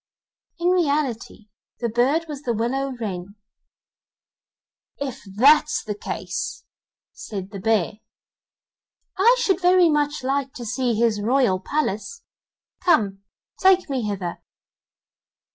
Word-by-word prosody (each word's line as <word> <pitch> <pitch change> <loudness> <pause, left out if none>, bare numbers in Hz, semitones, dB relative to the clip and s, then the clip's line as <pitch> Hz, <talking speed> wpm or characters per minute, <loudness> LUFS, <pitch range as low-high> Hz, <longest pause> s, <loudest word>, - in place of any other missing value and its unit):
In 345 +1 +1
reality 285 - -1 0.3
the 235 - -1
bird 255 +8 +1
was 290 -3 -7
the 245 -5 -1
willow 265 +5 -1
wren. 195 -3 -5 1.6
'IF 275 -2 -4
that's 295 +6 +5
the 210 - -3
case,' 205 - -5 0.5
said 195 -2 -7
the 200 - -6
bear, 215 -1 0 1.2
'I 465 +6 +6
should 385 -5 +1
very 360 -2 +5
much 295 -1 0
like 270 0 -1
to 240 - -7
see 250 0 0
his 220 -2 +1
royal 235 -4 +2
palace; 295 - -3 0.6
come, 205 - +2 0.4
take 375 -5 +4
me 245 -6 -1
thither. 185 -4 -4
255 Hz, 110 wpm, -23 LUFS, 215-300 Hz, 1.6 s, I